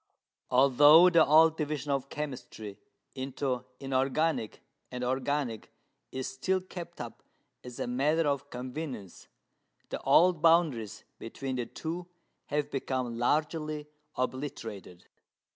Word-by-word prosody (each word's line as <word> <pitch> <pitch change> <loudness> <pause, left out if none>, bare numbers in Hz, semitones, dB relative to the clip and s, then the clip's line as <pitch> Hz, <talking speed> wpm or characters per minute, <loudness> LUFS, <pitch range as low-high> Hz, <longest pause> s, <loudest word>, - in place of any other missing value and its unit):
Although 145 +7 +7
the 165 -2 +6
old 160 +2 +5
division 150 -2 -2
of 140 0 -1
chemistry 125 -8 -6 0.3
into 130 -1 -3
inorganic 135 -1 0 0.3
and 125 0 -5
organic 130 -2 -2 0.4
is 130 0 -4
still 185 +8 -1
kept 175 -2 -9
up 120 -1 -7 0.4
as 125 -1 -9
a - - -1
matter 150 +6 +1
of 140 -2 -1
convenience, 125 - -7 0.6
the - - -4
old 175 -1 +4
boundaries 160 -11 +2 0.2
between 130 +3 -5
the 120 -2 -2
two 170 +2 -5 0.4
have 145 0 -1
become 130 -3 -2
largely 150 +3 0 0.3
obliterated. 125 -9 -5
140 Hz, 110 wpm, -30 LUFS, 125-155 Hz, 0.6 s, Although